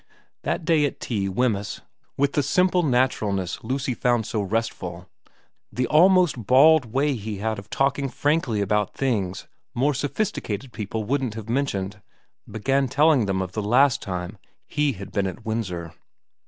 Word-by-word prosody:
That 165 - -2
day 160 -3 +3
at - - -8
tea 100 -5 -2
Wemyss, 105 -1 -1 0.4
with 140 0 +1
the 145 - +2
simple 180 +4 +2
naturalness 110 - 0
Lucy 130 +2 -2
found 120 -2 +1
so 110 - -2
restful, 95 -4 -3 0.6
the 125 - -1
almost 170 - +4
bald 145 +2 +6
way 135 +5 0
he 110 -3 -5
had 110 +1 -2
of 100 +1 -13
talking 135 +2 0
frankly 145 -7 0
about 105 0 0
things 105 -9 -1 0.3
more 140 +5 +2
sophisticated 135 - -3
people 110 +1 -4
wouldn't 130 -1 -1
have 110 -1 -7
mentioned, 105 -6 -2 0.5
began 135 +6 0
telling 140 -3 +3
them 95 -1 0
of 90 - -7
the 110 - -3
last 125 +6 +3
time 90 +1 -5 0.3
he 145 -2 0
had 100 0 -9
been 100 -2 0
at 100 +5 -8
Windsor. 90 -7 -3
115 Hz, 155 wpm, -24 LUFS, 100-140 Hz, 0.6 s, bald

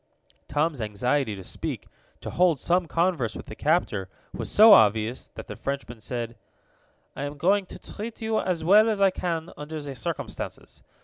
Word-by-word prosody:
Tom's 150 -2 0
anxiety 110 +3 0
to 95 - -9
speak, - - -5 0.3
to - - -6
hold 175 -5 +3
some 175 +3 +1
converse 165 -8 0
with - - -8
the 110 - -9
captor, 120 - 0 0.2
was - - -4
so 215 +1 +8
obvious 110 - +3
that - - -7
the - - -8
Frenchman 135 -4 -5
said: 115 +1 -4 0.8
"I - - -6
am 145 +1 -4
going 190 +5 +2
to - - -10
treat 220 +2 -8
you 220 -1 0
as 175 -4 -1
well 210 +6 +6
as 215 -2 -1
I 195 -1 +5
can 170 -2 -3
under 155 +1 -6
the 145 -2 -6
circumstances. 125 - -6
155 Hz, 175 wpm, -26 LUFS, 120-185 Hz, 0.8 s, so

